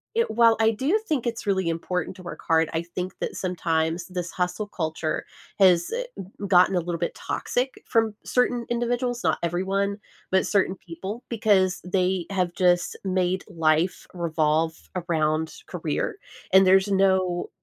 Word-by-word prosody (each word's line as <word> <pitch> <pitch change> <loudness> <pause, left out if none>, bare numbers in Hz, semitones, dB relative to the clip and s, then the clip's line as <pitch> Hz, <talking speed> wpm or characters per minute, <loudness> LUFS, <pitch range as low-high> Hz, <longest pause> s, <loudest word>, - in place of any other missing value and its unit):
it 465 0 +2
while 230 0 +5
I 225 0 +5
do 275 - +1
think 265 -6 0
it's 230 -1 -3
really 190 -3 +1
important 180 +3 -2
to 185 - -12
work 175 - -7
hard, 160 -1 +3
I 165 +1 -1
think 180 +2 -5
that - - -3
sometimes 165 -2 -1
this 180 -2 -4
hustle 180 +4 -2
culture 160 -4 -3 0.3
has, 180 -3 +5
eh, - - -1
g - - -5 0.2
gotten 185 +1 +5
a 180 - +3
little 170 -1 -3
bit - - -6
toxic 255 +2 -2
from 225 -2 +2
certain 245 -1 +1
individuals, 240 +1 -1
not - - +2
everyone, 195 +4 0 0.3
but 190 - +3
certain 195 -2 +2
people 190 +7 -7
because 200 -5 +2
they 180 -1 0
have 185 -3 0
just 175 -1 +2
made 185 -1 0
life 165 0 +1
revolve 160 -2 +1 0.2
around 160 -2 0 0.2
career, - - -2 0.4
and 190 0 +8
there's 190 +1 +5
no 190 -2 +2
185 Hz, 155 wpm, -25 LUFS, 170-205 Hz, 0.4 s, and